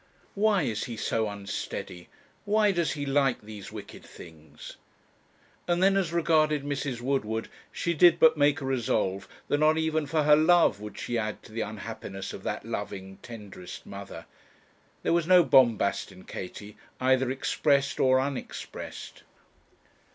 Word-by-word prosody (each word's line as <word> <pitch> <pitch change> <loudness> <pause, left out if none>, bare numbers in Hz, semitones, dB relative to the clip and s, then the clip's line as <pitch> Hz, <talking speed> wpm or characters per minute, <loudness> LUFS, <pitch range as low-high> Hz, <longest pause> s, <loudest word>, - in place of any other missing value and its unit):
'Why 205 -3 +2
is 110 -5 -2
he 115 -2 -6
so 110 -1 -1
unsteady? 100 -3 -6 0.3
Why 210 0 +3
does 170 -6 0
he 145 -1 -4
like 135 -2 +1
these 105 -2 -9
wicked 105 -2 -10
things?' 80 -2 -13 0.9
And 175 +1 +1
then 195 0 +5
as 190 -4 +1
regarded 155 -3 +2
Mrs. 140 -3 -3
Woodward, 115 -4 -1 0.2
she 170 - -1
did 170 +1 +6
but 160 0 +6
make 145 0 +2
a - - -4
resolve 115 -7 -1 0.2
that 145 - +1
not 155 +1 +4
even 160 -1 0
for 155 +2 +1
her 150 0 +7
love 165 - +4
would 105 -1 -8
she 120 -1 -2
add 110 -1 -4
to - - -15
the 115 +1 -3
unhappiness 105 -2 -6
of - - -8
that - - -4
loving, 95 0 -6
tenderest 105 -6 -10
mother. - - -9 0.8
There - - +2
was 170 -1 +1
no 180 -1 +7
bombast 115 -10 +3
in 95 -1 -14
Katie, 105 +3 -8 0.2
either 130 0 +2
expressed 140 +1 +1
or 130 0 +4
unexpressed. 135 0 -6
135 Hz, 150 wpm, -28 LUFS, 110-160 Hz, 0.9 s, her